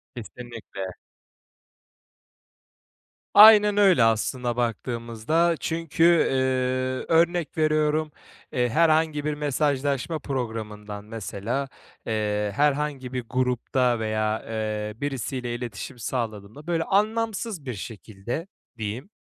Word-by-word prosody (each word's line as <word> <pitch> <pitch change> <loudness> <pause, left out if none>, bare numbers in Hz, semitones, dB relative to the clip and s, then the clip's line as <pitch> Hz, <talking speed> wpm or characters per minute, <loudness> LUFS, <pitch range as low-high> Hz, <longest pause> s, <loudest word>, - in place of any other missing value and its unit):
Kesinlikle. 115 -5 -8 2.4
Aynen 210 -1 +8
öyle 190 - +5
aslında 120 +2 +1
baktığımızda. 120 +7 0
Çünkü, 165 0 -1
eee, 170 -5 +4 0.8
örnek 170 0 +2
veriyorum, 155 0 +1 0.4
eee, 125 -1 +1
herhangi 155 +1 +2
bir 150 - 0
mesajlaşma 145 +1 -1
programından 110 -6 -5
mesela, 115 +4 -4 0.4
eee, 105 -2 -1
herhangi 145 -3 0
bir 125 -1 -2
grupta 125 -1 +1
veya, 110 0 -1
eee, 110 -1 -3
birisiyle 130 -3 -3
iletişim 120 +1 -6
sağladığımda, 115 +3 -5
böyle, 165 -1 +1
anlamsız 215 - 0
bir 125 - -3
şekilde 110 - -6 0.3
diyeyim. 115 - -5
125 Hz, 90 wpm, -25 LUFS, 110-155 Hz, 2.4 s, Aynen